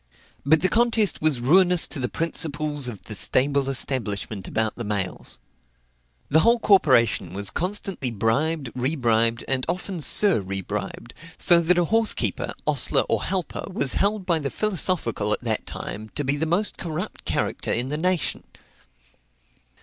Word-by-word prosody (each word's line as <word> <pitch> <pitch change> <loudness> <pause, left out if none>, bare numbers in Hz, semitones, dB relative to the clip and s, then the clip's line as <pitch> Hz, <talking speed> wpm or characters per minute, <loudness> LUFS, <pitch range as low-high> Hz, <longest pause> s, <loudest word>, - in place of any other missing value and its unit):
But 155 +3 +3
the 185 - +3
contest 225 -1 +1
was 155 -6 +1
ruinous 180 +6 +5
to - - -5
the 125 -2 -2
principles 150 -2 -2
of 110 -5 -8
the 110 - -9
stable 135 +6 +2
establishment 110 -7 -2
about 110 -1 -2
the 120 - -6
mails. 100 -3 -4 0.9
The 155 - +4
whole 235 +8 +4
corporation 130 - +2
was 100 0 +1
constantly 185 -6 -3
bribed, 125 +6 -1
rebribed, 120 -4 0
and 130 -1 0
often 180 +1 -4
sur 185 - +4
rebribed; 95 +4 -5 0.2
so 175 -1 +5
that 170 +1 +1
a 175 - +2
horse 225 +3 +2
keeper, - - -2
ostler, - - +2
or - - 0
helper, 185 -4 -3
was 140 -7 +1
held 200 -1 0
by 170 -3 +1
the 140 -2 -3
philosophical 170 - 0
at - - -3
that 115 -3 -3
time 110 +2 -7
to 145 - -1
be 140 +1 -1
the 160 +2 -2
most 185 +6 0
corrupt 175 +4 -5
character - - -2
in 120 +3 -1
the 150 - -2
nation. 180 0 -1
145 Hz, 155 wpm, -23 LUFS, 115-180 Hz, 0.9 s, ruinous